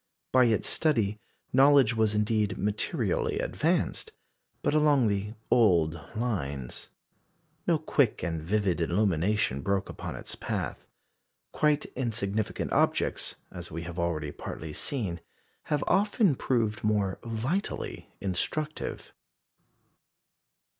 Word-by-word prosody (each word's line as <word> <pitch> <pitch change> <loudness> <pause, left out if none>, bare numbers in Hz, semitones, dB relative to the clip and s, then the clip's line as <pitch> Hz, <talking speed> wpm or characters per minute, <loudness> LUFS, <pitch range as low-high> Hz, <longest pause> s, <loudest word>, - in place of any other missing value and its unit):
By 130 -1 +6
its 110 -3 +2
study 110 -10 +1 0.3
knowledge 135 -3 +6
was 110 -1 +2
indeed 105 -1 +1
materially 105 +2 0
advanced, - - 0 0.5
but - - +2
along 150 -4 +4
the 100 +2 -2 0.2
old 85 -9 +4 0.2
lines. 70 - -3 0.8
No - - +4
quick - - +1
and 80 -2 -2
vivid 95 +1 0
illumination 95 - +1
broke 100 +5 0
upon - - -6
its - - -6
path. - - -4 0.6
Quite 150 -1 +2
insignificant 110 -4 -2
objects - - +1 0.2
as 85 -1 -7
we 85 +1 -5
have 85 0 -6
already 80 -4 -1
partly 75 +1 -7
seen 95 - -2 0.4
have 150 -1 0
often 205 - +3
proved 115 -4 0
more 105 -3 +1
vitally 120 - -3
instructive. 150 - -3
105 Hz, 105 wpm, -29 LUFS, 90-125 Hz, 0.8 s, By